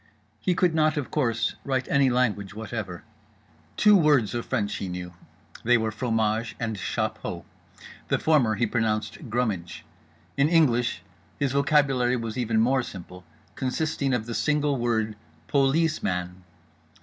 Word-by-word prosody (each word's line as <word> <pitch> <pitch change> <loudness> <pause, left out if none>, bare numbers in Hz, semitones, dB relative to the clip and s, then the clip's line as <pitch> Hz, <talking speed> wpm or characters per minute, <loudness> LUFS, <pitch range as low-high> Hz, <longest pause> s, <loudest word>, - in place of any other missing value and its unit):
He 180 - 0
could 175 -1 +2
not, 155 -1 +2
of 145 - -3
course, 120 -5 0
write 130 -2 -1
any 140 -1 +3
language 105 -6 0
whatever. 105 -5 -5 0.7
Two 210 -1 +6
words 150 - +3
of 120 -1 -3
French 105 -5 -1
he 95 - -4
knew: 90 0 -6 0.5
they 120 +1 +4
were 110 -1 -1
fromage 110 0 -1
and 115 -2 -2
chapeau. 95 -3 -3 0.6
The - - +2
former 135 -9 +3
he 120 - +1
pronounced 110 +3 -2
"grumidge." 105 -7 -2 0.5
In 140 +2 +3
English 125 -7 +2 0.3
his 140 -2 0
vocabulary 140 -3 +2
was 115 -2 -4
even 115 -3 0
more 130 +4 +3
simple, 90 -5 -9 0.3
consisting 135 +3 -1
of 120 -3 0
the 115 - -5
single 150 +1 +1
word 110 -3 0 0.3
"po 140 - +2
lees 155 +3 +1
man." 90 0 -3
120 Hz, 145 wpm, -26 LUFS, 110-140 Hz, 0.7 s, Two